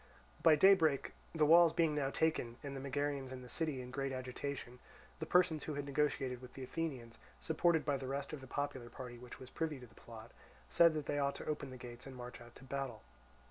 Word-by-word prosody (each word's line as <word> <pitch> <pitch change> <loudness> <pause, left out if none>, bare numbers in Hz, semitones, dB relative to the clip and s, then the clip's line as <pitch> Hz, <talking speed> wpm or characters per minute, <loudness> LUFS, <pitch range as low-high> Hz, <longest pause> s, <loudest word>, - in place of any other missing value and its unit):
By 160 -2 +7
daybreak, 160 -4 +5 0.2
the 155 -2 +4
walls 165 +1 +7
being 165 -3 +3
now 145 -2 0
taken 140 -6 0
and 140 -1 -5
the - - -4
Megarians 140 0 -2
in 130 -1 -7
the - - -10
city 155 -4 -2
in 125 - -9
great 135 0 -2
agitation, 130 0 -5 0.4
the 160 - -4
persons 180 -3 +3
who 155 - -3
had 145 0 -3
negotiated 135 -3 0
with 125 -1 -12
the 135 - -6
Athenians, 130 -5 -4 0.2
supported 160 0 +2
by 145 -2 +1
the 135 -1 -6
rest 140 +2 -3
of 150 - -5
the 130 - -10
popular 140 -3 -3
party 125 -2 -8
which 125 0 -10
was 130 0 -11
privy 160 -3 -2
to 125 - -10
the 110 - -19
plot, 115 0 -11 0.4
said 170 -2 +6
that 150 -2 -2
they 145 - -1
ought 140 0 +1
to - - -7
open 150 -3 -3
the 130 - -8
gates 120 +1 -9
and 135 - -8
march 125 -1 -8
out 120 0 -14
to - - -14
battle. 135 -4 -4
140 Hz, 225 wpm, -36 LUFS, 125-155 Hz, 0.4 s, By